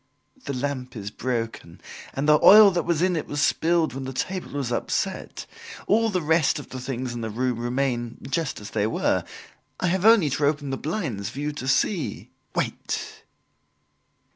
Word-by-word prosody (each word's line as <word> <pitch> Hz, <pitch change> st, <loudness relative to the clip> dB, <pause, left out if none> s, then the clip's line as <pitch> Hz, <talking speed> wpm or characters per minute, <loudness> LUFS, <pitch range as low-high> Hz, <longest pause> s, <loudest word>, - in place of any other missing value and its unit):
"The -, -, -3 dB
lamp 130 Hz, -2 st, -3 dB
is 105 Hz, -2 st, -6 dB
broken 115 Hz, -9 st, -4 dB, 0.4 s
and 140 Hz, +2 st, -1 dB
the 150 Hz, 0 st, +6 dB
oil 210 Hz, 0 st, +9 dB
that 175 Hz, -1 st, -1 dB
was 170 Hz, 0 st, +1 dB
in 185 Hz, -1 st, +2 dB
it 155 Hz, -, -3 dB
was 145 Hz, -, -3 dB
spilled 160 Hz, 0 st, +2 dB
when 135 Hz, 0 st, -5 dB
the 130 Hz, -, -4 dB
table 185 Hz, +7 st, -4 dB
was 140 Hz, -4 st, -2 dB
upset. -, -, -2 dB, 0.4 s
All 225 Hz, +2 st, +3 dB
the 180 Hz, -5 st, -1 dB
rest 160 Hz, -1 st, +3 dB
of 145 Hz, -, -8 dB
the 130 Hz, -, -6 dB
things 125 Hz, -1 st, -4 dB
in 120 Hz, -, -5 dB
the 110 Hz, -, -3 dB
room 125 Hz, +2 st, -1 dB
remain 120 Hz, -1 st, -1 dB
just 155 Hz, +1 st, -2 dB
as 105 Hz, 0 st, -9 dB
they 105 Hz, -1 st, 0 dB
were. 110 Hz, -, 0 dB, 0.6 s
I -, -, -1 dB
have 185 Hz, +1 st, 0 dB
only 215 Hz, -9 st, +6 dB
to 145 Hz, +2 st, +1 dB
open 145 Hz, -2 st, -1 dB
the -, -, 0 dB
blinds 140 Hz, -, -3 dB
for 135 Hz, -, -8 dB
you 150 Hz, +1 st, -1 dB
to 145 Hz, -3 st, -6 dB
see." 155 Hz, +5 st, 0 dB, 0.2 s
"Wait." -, -, -3 dB
140 Hz, 185 wpm, -25 LUFS, 125-165 Hz, 0.6 s, oil